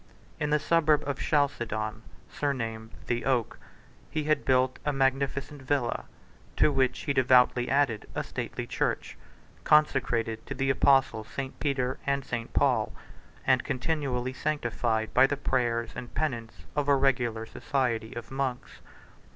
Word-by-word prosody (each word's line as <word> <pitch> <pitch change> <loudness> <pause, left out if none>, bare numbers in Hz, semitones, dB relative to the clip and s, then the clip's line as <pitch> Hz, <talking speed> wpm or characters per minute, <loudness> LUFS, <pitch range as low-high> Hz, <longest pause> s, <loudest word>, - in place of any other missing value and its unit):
In 150 - 0
the 150 - +4
suburb 155 -2 +2
of 140 -1 -2
Chalcedon, 115 -7 0 0.3
surnamed 115 -6 -3 0.2
the 120 0 -1
Oak, 125 -4 0 0.5
he 155 -1 -2
had 155 +1 +1
built 130 0 +2
a 150 - +1
magnificent 135 +1 0
villa; 130 -3 -1 0.5
to - - +4
which 130 -2 +1
he 140 - -1
devoutly 125 -1 +4
added 135 -6 +1
a - - -1
stately - - -5
church, - - -2 0.5
consecrated 120 -7 +2
to - - -4
the 135 +1 +1
apostles 135 -5 +3
St. 135 0 -6
Peter 130 -3 -1
and 140 -1 0
St. 115 -1 -4
Paul, - - +2 0.5
and - - +3
continually 130 -2 -2
sanctified 120 -6 -1
by 135 - +6
the 145 - -2
prayers 120 -4 0
and 120 0 -7
penance 120 -8 -3
of 145 -1 0
a 140 - +5
regular 125 -5 +1
society 120 -2 -2
of 120 +1 -7
monks. 135 -2 -3
130 Hz, 140 wpm, -28 LUFS, 120-140 Hz, 0.5 s, by